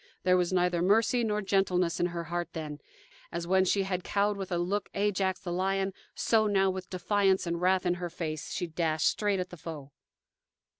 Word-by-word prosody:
There 185 Hz, 0 st, +4 dB
was 180 Hz, -1 st, +1 dB
neither 180 Hz, -2 st, +2 dB
mercy 225 Hz, +6 st, +3 dB
nor 210 Hz, -1 st, 0 dB
gentleness 185 Hz, -3 st, +1 dB
in 175 Hz, -, +2 dB
her 170 Hz, -1 st, -4 dB
heart 175 Hz, +1 st, -4 dB
then. 150 Hz, -3 st, -6 dB, 0.5 s
As 170 Hz, -, -3 dB
when 190 Hz, +2 st, +3 dB
she 195 Hz, +2 st, +2 dB
had 185 Hz, -2 st, -2 dB
cowed 205 Hz, +1 st, +1 dB
with 195 Hz, -1 st, -6 dB
a 175 Hz, -, +1 dB
look 190 Hz, +4 st, -1 dB
Ajax, 195 Hz, -2 st, 0 dB
the 175 Hz, -, -5 dB
lion, 195 Hz, +1 st, 0 dB, 0.2 s
so 220 Hz, -2 st, +2 dB
now, 195 Hz, -2 st, +3 dB
with 185 Hz, 0 st, -6 dB
defiance 190 Hz, +1 st, +1 dB
and 170 Hz, 0 st, -2 dB
wrath 185 Hz, +1 st, +2 dB
in 175 Hz, -, +3 dB
her 175 Hz, -, -2 dB
face, 160 Hz, -3 st, -5 dB
she 180 Hz, -, -2 dB
dashed 160 Hz, -1 st, -1 dB
straight 205 Hz, -2 st, +1 dB
at 180 Hz, 0 st, -4 dB
the 175 Hz, -, -9 dB
foe. 150 Hz, -3 st, -8 dB
185 Hz, 200 wpm, -29 LUFS, 175-195 Hz, 0.5 s, There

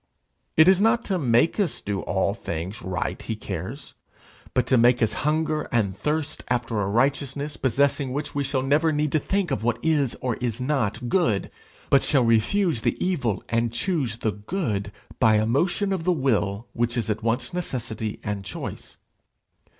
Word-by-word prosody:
It 160 Hz, +2 st, +7 dB
is 190 Hz, 0 st, +6 dB
not 225 Hz, +2 st, +3 dB
to 190 Hz, -3 st, 0 dB
make 125 Hz, -, +3 dB
us 190 Hz, -7 st, 0 dB
do 100 Hz, -1 st, -3 dB
all 100 Hz, 0 st, 0 dB
things 95 Hz, +2 st, -5 dB
right 95 Hz, 0 st, -3 dB
he 110 Hz, -, -4 dB
cares, 105 Hz, -, -6 dB, 0.6 s
but -, -, +3 dB
to -, -, +3 dB
make 120 Hz, +1 st, +5 dB
us 115 Hz, -, +1 dB, 0.2 s
hunger 155 Hz, -1 st, 0 dB
and 100 Hz, -5 st, +1 dB
thirst 155 Hz, +6 st, -2 dB
after 120 Hz, -3 st, -1 dB
a 95 Hz, -, 0 dB
righteousness 140 Hz, +5 st, 0 dB
possessing 135 Hz, +1 st, +1 dB
which 145 Hz, +3 st, -4 dB
we 145 Hz, -, 0 dB
shall 135 Hz, -1 st, -1 dB
never 150 Hz, +4 st, +3 dB
need 150 Hz, -1 st, 0 dB
to 155 Hz, -, +3 dB
think 190 Hz, +1 st, -1 dB
of 130 Hz, -, -1 dB
what 120 Hz, +1 st, +1 dB
is 145 Hz, -6 st, +2 dB
or 125 Hz, -2 st, -2 dB
is 120 Hz, -2 st, -2 dB
not 125 Hz, -3 st, -1 dB
good, 140 Hz, -, +1 dB, 0.4 s
but 140 Hz, -, +6 dB
shall 135 Hz, -4 st, +2 dB
refuse 115 Hz, -, +2 dB
the -, -, 0 dB
evil 135 Hz, -, 0 dB
and 115 Hz, 0 st, 0 dB
choose 135 Hz, -, -1 dB
the 115 Hz, -2 st, 0 dB
good 105 Hz, -, -3 dB, 0.3 s
by 110 Hz, -1 st, +5 dB
a 105 Hz, 0 st, +3 dB
motion 175 Hz, -, +1 dB
of 185 Hz, -4 st, -2 dB
the 180 Hz, -, +2 dB
will 110 Hz, -, 0 dB
which 120 Hz, +1 st, -1 dB
is 115 Hz, -, 0 dB
at 105 Hz, -, -3 dB
once 120 Hz, +4 st, -1 dB
necessity 115 Hz, -10 st, -4 dB
and 105 Hz, -2 st, -3 dB
choice. -, -, -7 dB
125 Hz, 180 wpm, -25 LUFS, 110-150 Hz, 0.6 s, It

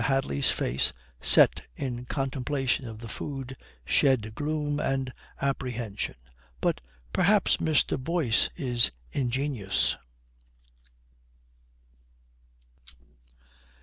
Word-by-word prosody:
Hadley's 135 Hz, -, +1 dB
face, 65 Hz, +3 st, +1 dB, 0.3 s
set -, -, +7 dB
in 125 Hz, -2 st, -4 dB
contemplation 135 Hz, -1 st, -1 dB
of 110 Hz, -1 st, -8 dB
the 115 Hz, +1 st, -9 dB
food, 135 Hz, +3 st, -5 dB, 0.3 s
shed 115 Hz, -6 st, +2 dB
gloom 150 Hz, +2 st, -2 dB
and 135 Hz, -2 st, -1 dB, 0.3 s
apprehension. 125 Hz, -6 st, -2 dB, 0.4 s
"But 65 Hz, -, 0 dB, 0.3 s
perhaps 200 Hz, +2 st, +3 dB
Mr. 150 Hz, -4 st, +1 dB
Boyce 155 Hz, -8 st, +2 dB
is 125 Hz, -, +2 dB, 0.2 s
ingenious." 125 Hz, -7 st, 0 dB
130 Hz, 80 wpm, -28 LUFS, 115-140 Hz, 0.4 s, set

